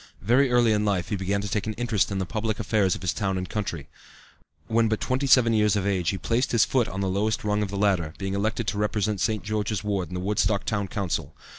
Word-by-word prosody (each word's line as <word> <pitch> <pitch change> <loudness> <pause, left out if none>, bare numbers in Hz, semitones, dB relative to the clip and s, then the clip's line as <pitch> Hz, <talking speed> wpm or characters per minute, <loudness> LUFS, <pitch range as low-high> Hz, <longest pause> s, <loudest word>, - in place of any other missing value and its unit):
Very 125 +6 +4
early 120 -2 +4
in 105 -1 +2
life 100 -4 0
he 105 - -1
began 100 +1 -1
to 100 - -4
take 105 +1 -2
an 110 - -2
interest 110 -3 0
in 100 - -2
the 95 - -1
public 110 +1 -3
affairs 105 -4 +1
of - - -9
his 85 -3 0
town 95 +4 -1
and 90 0 -3
country. 90 -8 -4 0.8
When 115 0 +2
but 110 - 0
twenty 130 +2 -1
seven 120 -3 +5
years 105 -1 +3
of 100 -2 -1
age 95 -4 0
he 95 - -1
placed 120 +6 0
his 115 - +5
foot 125 -4 +1
on 95 - -4
the 95 - 0
lowest 105 +4 0
rung 105 0 0
of 105 - -2
the 100 - -4
ladder, 95 -6 +1
being 95 -1 -3
elected 110 +4 -1
to 100 +1 -3
represent 105 -1 0
St. 110 -2 0
George's 105 -1 -2
Ward 100 -4 -1
in 90 - -7
the - - -2
Woodstock 100 +1 0
Town 105 -2 -1
Council. 100 -5 -3
105 Hz, 255 wpm, -25 LUFS, 95-110 Hz, 0.8 s, seven